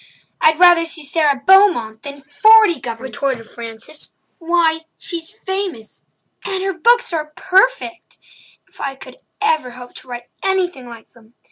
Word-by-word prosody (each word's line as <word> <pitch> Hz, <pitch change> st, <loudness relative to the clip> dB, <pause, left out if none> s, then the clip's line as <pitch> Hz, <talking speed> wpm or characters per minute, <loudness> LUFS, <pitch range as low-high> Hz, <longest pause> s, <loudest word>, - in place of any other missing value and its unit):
"I'd 315 Hz, 0 st, +4 dB
rather 350 Hz, -1 st, +6 dB
see 330 Hz, -2 st, -7 dB
Sara 285 Hz, -2 st, +1 dB
Beaumont 350 Hz, -, +4 dB
than 280 Hz, +1 st, -9 dB
forty 435 Hz, -7 st, +5 dB
governors," 240 Hz, +2 st, -7 dB
retorted 265 Hz, -5 st, -3 dB
Frances. 230 Hz, +5 st, -9 dB, 0.2 s
"Why, 330 Hz, -1 st, +1 dB
she's 335 Hz, -3 st, -6 dB
famous—and 380 Hz, -, -6 dB
her 390 Hz, 0 st, -1 dB
books 475 Hz, +4 st, +2 dB
are 305 Hz, -2 st, -3 dB
perfect! 380 Hz, -2 st, 0 dB, 0.5 s
If -, -, -16 dB
I 275 Hz, -1 st, -3 dB
could -, -, -13 dB, 0.3 s
ever 315 Hz, -10 st, +1 dB
hope 245 Hz, 0 st, -11 dB
to -, -, -13 dB
write 245 Hz, -1 st, -8 dB
anything 360 Hz, -9 st, -1 dB
like 230 Hz, -1 st, -13 dB
them! 230 Hz, 0 st, -23 dB
320 Hz, 140 wpm, -18 LUFS, 250-375 Hz, 0.5 s, rather